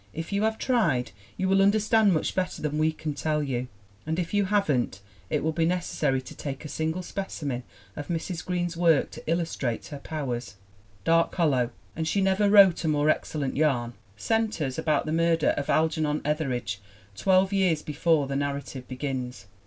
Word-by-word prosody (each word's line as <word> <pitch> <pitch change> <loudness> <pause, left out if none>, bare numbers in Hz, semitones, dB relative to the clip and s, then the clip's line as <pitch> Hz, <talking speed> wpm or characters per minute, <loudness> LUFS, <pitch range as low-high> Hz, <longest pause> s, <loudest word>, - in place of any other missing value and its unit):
If 165 +5 -5
you 200 - +1
have 220 0 +1
tried 170 - +1 0.3
you 190 - 0
will 195 +1 +4
understand 215 +1 +4
much 160 - 0
better 185 -1 -2
than 150 0 -2
we 155 +1 +3
can 155 -1 -4
tell 150 +1 -1
you. 130 -3 -2 0.4
And 160 +1 -2
if 175 0 -3
you 205 -1 +3
haven't 155 - +1 0.3
it - - 0
will 160 - +1
be 165 +1 0
necessary 160 -6 0
to - - -10
take 140 +1 -6
a - - -6
single 160 +5 -2
specimen 145 -10 -4 0.3
of 145 - -6
Mrs. 170 0 -3
Green's 175 -1 -2
work 165 -4 +3
to - - -10
illus 165 0 0
trate 120 -4 -2
her 145 - -7
powers. 125 -8 -4 0.5
Dark 165 0 +3
Hollow 135 -9 +2 0.3
and 160 0 -2
she 200 - +1
never 195 +1 +3
wrote 195 -4 +7
a - - 0
more 150 0 +3
excel 155 - -3
lent 135 - -2
yarn 130 -6 +1 0.2
centers 170 - -1
about 155 -2 +1
the 155 - -2
murder 165 0 +2
of 140 - -1
Algernon 155 -1 +1
Ethe 150 0 0
ridge 110 -6 -3 0.4
twelve 190 - +3
years 180 -6 +2
before 155 0 +1
the 135 0 -4
narrative 140 -2 -3
begins. 130 -5 -4
155 Hz, 185 wpm, -27 LUFS, 140-180 Hz, 0.5 s, wrote